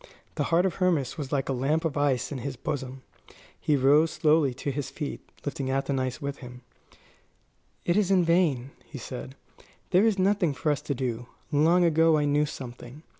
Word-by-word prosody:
The - - -1
heart 170 +2 +2
of 190 - -1
Hermas 170 -9 +1
was 145 -4 -6
like 140 -2 0
a 135 - 0
lump 145 +6 0
of 155 - -1
ice 145 -3 0
in 140 - -4
his 135 +2 -5
bosom. 130 -1 -5 0.6
He 150 - +1
rose 145 +4 +4
slowly 155 -3 +2
to 140 +2 -3
his 140 0 -4
feet, 150 -3 -5 0.2
lifting 140 -2 -3
Athenais 135 -1 -1
with 140 -2 -4
him. 125 -1 -11 1.2
"It 175 - +2
is 205 -3 +2
in 185 -3 +4
vain," 155 -7 +2
he 150 - -10
said; 130 +2 -7 0.6
"there 190 +4 +5
is 215 -3 +1
nothing 185 -5 +2
for 150 - 0
us 145 -1 -1
to 145 -1 -3
do. 125 -2 -3 0.2
Long 165 +4 +4
ago 165 -1 +4
I 150 - +1
knew 145 +1 +2
something. 125 +1 -9
145 Hz, 185 wpm, -27 LUFS, 130-165 Hz, 1.2 s, there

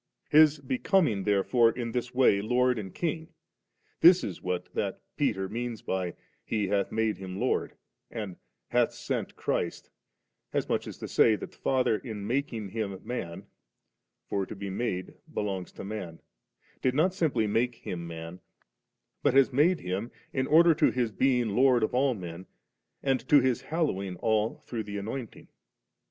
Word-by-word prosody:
His 155 0 +6
becoming 130 - +1
therefore 105 +4 +4
in 115 0 -4
this 125 +1 -2
way 125 -6 +4
Lord 125 +2 +2
and 95 -3 -6
King, 160 - -3 0.7
this 175 +2 +7
it - - -1
is 90 - -9 0.3
that - - -2 0.2
Peter 105 -9 0
means 115 +2 -4
by, 90 -2 -2
* - - -41
He 105 -4 -1
hath 100 -1 +1
made 110 -1 0
Him 95 0 -6
Lord,* - - 0 0.3
and 105 -5 -6 0.3
*hath - - +2
sent - - -3
Christ;' - - -2 0.6
as - - 0
much - - -1
as - - -7
to - - -6
say, 110 -2 +4
Uiat - - -16
the - - -4
Father 130 -5 +1
in 110 -5 -6
making 120 -4 -2
Him 100 -3 -3
man 85 -9 -5 0.8
(for 100 -2 -1
to - - -7
be 100 0 -5
made 95 -3 -3 0.2
belongs 95 -3 -3
to - - -8
man), 95 -5 -6 0.6
did 130 0 +1
not 175 +5 +3
simply 150 - +1
make 115 +4 +1
Him 85 -6 -6
man, 85 +2 -7 0.8
but - - +2
has 135 -1 +5
made 160 +7 +3
Him 95 +6 -3 0.2
in 130 0 0
order 165 +2 +6
to 155 0 +3
His 120 -3 0
being 125 +1 +2
Lord 125 +3 +4
of 110 - 0
all 130 0 +2
men, 90 -1 -8 0.6
and 135 -2 +2
to 145 - +8
His 130 -2 +1
hallowing 100 - -1
all 110 +3 0
through 115 -2 -3
the 100 0 -5
Anointing. 115 +3 -6
115 Hz, 165 wpm, -29 LUFS, 100-130 Hz, 0.8 s, to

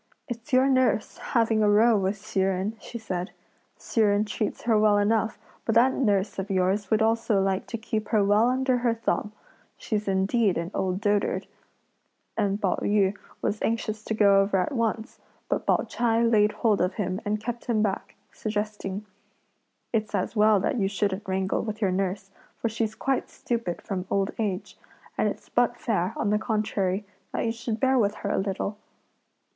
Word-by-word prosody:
"It's 240 +2 -7
your 260 +1 +5
nurse 255 -5 +1
having 225 -2 +1
a 210 - +4
row 220 +3 +5
with 195 0 0
Hsi 200 -1 -4
Jen!" 190 +3 0
she 235 - -8
said. 185 -4 -4 0.5
"Hsi 225 - -1
Jen 205 0 +3
treats 210 0 -3
her 230 -1 +3
well 210 -1 +4
enough, 220 +1 +1 0.3
but 225 - 0
that 255 +3 +5
nurse 205 -6 +1
of 195 +2 -4
yours 190 +1 +1
would 220 0 +3
also 225 -2 +2
like 195 0 0
to 235 - -4
keep 220 -1 -3
her 215 -2 +3
well 210 +4 +4
under 260 0 +1
her 235 -1 +1
thumb; 220 -2 -1 0.5
she's 210 -2 -3
indeed 195 +2 +2
an 170 +2 -3
old 185 +1 -1
dotard;" 205 -1 +1 0.9
and 205 -2 0
Pao 195 -4 +1
yü 205 -1 +2 0.3
was 210 - -1
anxious 220 -1 -1
to 220 - -2
go 200 -2 +5
over 195 0 +1
at 180 - 0
once, 230 -3 -2 0.3
but - - -2
Pao - - +3
ch'ai 235 -1 +1
laid 215 -2 +4
hold 215 -1 +1
of 180 +2 0
him 190 -1 -2
and 210 0 -1
kept 235 +2 -5
him 220 -3 +1
back, 195 -3 -2 0.2
suggesting: 210 -2 -4 0.9
"It's 220 -1 0
as - - -2
well 210 -1 +5
that 250 +5 0
you 195 - +2
shouldn't 200 +1 -2
wrangle 190 0 0
with 215 -1 -5
your 195 -4 +1
nurse, 195 +1 -2 0.3
for 230 - -1
she's 220 -1 -2
quite 270 -1 -1
stupid 230 -8 -3
from 185 -2 -4
old 195 0 +1
age; 205 -2 -3 0.4
and - - +1
it's - - -8
but - - +2
fair, 200 -3 -1
on 205 - 0
the 210 - +2
contrary, 210 -3 -1 0.3
that - - -1
you 225 - +1
should 230 -1 -4
bear 265 -1 +3
with 205 -2 +1
her - - 0
a - - +1
little." 200 +1 -3
210 Hz, 185 wpm, -26 LUFS, 195-225 Hz, 0.9 s, your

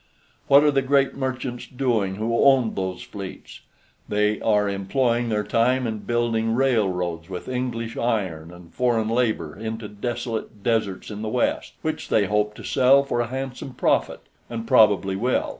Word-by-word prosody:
What 140 0 +7
are 150 - +4
the 135 -1 +2
great 135 0 +2
merchants 130 -2 -4
doing 120 -7 0
who 115 +3 0
owned 135 -5 +4
those 95 -1 -3
fleets? 100 -2 -9 0.5
They 105 0 +1
are 105 -2 +2
employing 115 +5 0
their 105 -1 0
time 125 +4 +1
in 110 -2 -3
building 115 +1 0
railroads 95 -10 0
with 90 -1 -6
English 125 -3 -3
iron 95 -9 -2
and 85 -1 -14
foreign 115 -3 +1
labor 110 -10 0
into 110 +1 -5
desolate 110 -1 -5
deserts 110 -4 -1
in 105 0 -6
the 110 - -3
West, - - -1
which - - -3
they 105 - +3
hope 105 +2 0
to - - -10
sell 135 +2 +4
for 120 -3 -1
a 120 - -2
handsome 130 +1 -6
profit, - - +1 0.3
and 115 -1 -5
probably 100 -4 +4
will. 125 +6 0
115 Hz, 160 wpm, -23 LUFS, 105-125 Hz, 0.5 s, What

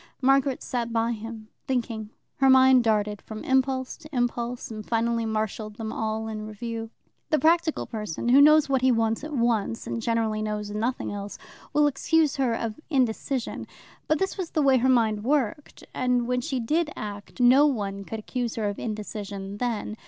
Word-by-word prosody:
Margaret 270 0 +2
sat 235 -2 -2
by 230 0 +1
him, 225 -1 -7 0.2
thinking. 230 -4 -2 0.3
Her 270 -1 +4
mind 260 -1 +7
darted 210 -2 0
from 215 -1 -8
impulse 265 -1 +1
to 305 -2 -14
impulse, 245 -2 -2
and 215 -1 -6
finally 230 +1 0
marshalled 215 -1 -3
them 220 0 -5
all 220 0 -2
in 215 -1 -5
review. 225 +1 -5 0.4
The 310 - +3
practical 325 0 +2
person, 215 -1 -4
who 270 +3 +7
knows 305 +1 +6
what 270 -2 +1
he 260 0 +4
wants 225 +1 +1
at 305 - -6
once, 230 -4 0
and 230 - -3
generally 225 -2 0
knows 210 -1 -3
nothing 225 +5 -2
else, 205 0 -6 0.3
will 295 0 +4
excuse 295 +2 +2
her 255 -4 +1
of 225 +1 -4
indecision. 260 -2 -1 0.4
But 310 - +2
this 385 +3 -2
was 355 -3 -3
the 305 - 0
way 270 -2 +5
her 260 +2 +2
mind 220 -4 +2
worked. 280 +1 -1
And 250 -1 +1
when 250 +1 0
she 260 +1 -2
did 305 +7 0
act, 205 +1 -7
no 255 +4 +6
one 200 -7 -2
could 225 - -6
accuse 240 +2 -3
her 220 -2 -1
of 205 - -4
indecision 205 -2 -5
then. 225 -2 -3
235 Hz, 180 wpm, -26 LUFS, 215-265 Hz, 0.4 s, mind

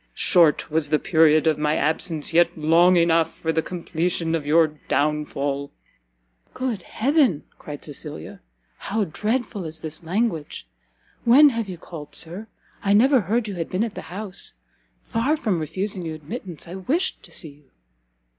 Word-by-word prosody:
Short 165 -5 +4
was 155 -1 +1
the 155 - +3
period 160 -3 +4
of 160 -1 +2
my 150 0 +1
absence, 160 +1 -1
yet 170 0 +3
long 170 +4 +5
enough 165 -1 +3
for 160 0 -1
the 160 - +2
completion 170 -1 -2
of 155 -3 -2
your 160 +1 +5 0.2
downfall!" 145 -1 -1 0.9
"Good 250 -7 -2
heaven," 260 - +1 0.2
cried 145 -1 -7
Cecilia, 145 - -6 0.4
"how 215 +2 -1
dreadful 210 +3 -2
is 160 -1 -6
this 155 +1 -6
language! 170 -3 -2 0.6
when 280 +5 +7
have 230 -5 -3
you 180 - -6
called, 155 -3 -10
Sir? 175 +7 -6 0.4
I 200 0 +3
never 255 +4 +5
heard 215 +5 0
you 205 - -4
had 170 -3 -4
been 185 +4 0
at 230 -3 -3
the - - -6
house. 195 +1 -3 0.5
Far 260 +8 0
from 205 - 0
refusing 185 +4 -3
you 160 -1 -4
admittance, 170 - -7
I 170 - -8
wished 270 - -1
to - - -15
see 160 - -5
you." 145 -1 -20
170 Hz, 160 wpm, -23 LUFS, 155-210 Hz, 0.9 s, when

